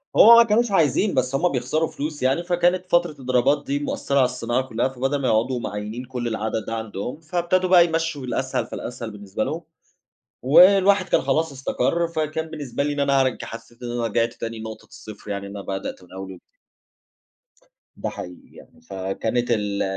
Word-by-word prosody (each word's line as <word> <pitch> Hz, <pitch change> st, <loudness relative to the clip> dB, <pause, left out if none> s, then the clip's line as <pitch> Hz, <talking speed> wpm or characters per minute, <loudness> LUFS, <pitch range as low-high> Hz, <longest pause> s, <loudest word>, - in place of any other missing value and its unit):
هو 235 Hz, +2 st, +9 dB
ما 235 Hz, -, +9 dB
كانوش 230 Hz, 0 st, +1 dB
عايزين، 190 Hz, +3 st, +2 dB
بس 130 Hz, +1 st, 0 dB
هُم 175 Hz, +5 st, +2 dB
بيخسروا 135 Hz, +5 st, 0 dB
فلوس 150 Hz, -1 st, -5 dB
يعني 135 Hz, +6 st, +2 dB
فكانت 175 Hz, +1 st, +1 dB
فترة 175 Hz, -2 st, +2 dB
الإضرابات 135 Hz, +1 st, +1 dB
دي 140 Hz, +1 st, -1 dB
مأثّرة 140 Hz, -1 st, -3 dB
على 130 Hz, -, +5 dB
الصناعة 125 Hz, 0 st, -1 dB
كلّها، 120 Hz, +2 st, 0 dB
فبدَل 135 Hz, +2 st, -2 dB
ما 130 Hz, -, 0 dB
يقعدوا 120 Hz, +3 st, +1 dB
معيّنين 105 Hz, +3 st, -5 dB
كلّ 125 Hz, -1 st, -4 dB
العدد 110 Hz, -1 st, -2 dB
ده 115 Hz, -, -3 dB
عندهم، 110 Hz, +4 st, -5 dB
فابتدوا 175 Hz, +3 st, 0 dB
بقى 175 Hz, -2 st, +7 dB
يمشّوا 165 Hz, -3 st, -2 dB
الأسهل 130 Hz, 0 st, -2 dB
فالأسهل 120 Hz, -2 st, -6 dB
بالنسبة 105 Hz, 0 st, -4 dB
لهم، 160 Hz, +8 st, -3 dB, 0.8 s
والواحد 190 Hz, +6 st, +6 dB
كان -, -, +3 dB
خلاص 145 Hz, +3 st, 0 dB
استقر 135 Hz, +5 st, -1 dB
فكان 160 Hz, -1 st, -2 dB
بالنسبة 145 Hz, -4 st, -4 dB
لي 145 Hz, +1 st, -1 dB
إن 145 Hz, -, -3 dB
أنا 140 Hz, -1 st, +3 dB
هارج 130 Hz, -2 st, 0 dB
حسّيت 115 Hz, +1 st, -11 dB
إن 120 Hz, -, -4 dB
أنا 120 Hz, -1 st, -1 dB
رِجعْت 115 Hz, +1 st, 0 dB
تاني 115 Hz, 0 st, -6 dB
لنقطة 110 Hz, 0 st, -8 dB
الصفر، 105 Hz, -1 st, -11 dB
يعني 100 Hz, 0 st, -4 dB
أنا 100 Hz, 0 st, -7 dB
بدأت 95 Hz, -1 st, -5 dB
من 90 Hz, -, -19 dB
أول 95 Hz, 0 st, -7 dB
وجدي 90 Hz, -, -13 dB, 1.6 s
ده -, -, -3 dB
حقيقي 90 Hz, 0 st, -9 dB
يعني، 80 Hz, -, -17 dB
فكانت 95 Hz, +7 st, -2 dB
ال 105 Hz, -3 st, 0 dB
130 Hz, 180 wpm, -23 LUFS, 115-160 Hz, 1.6 s, هو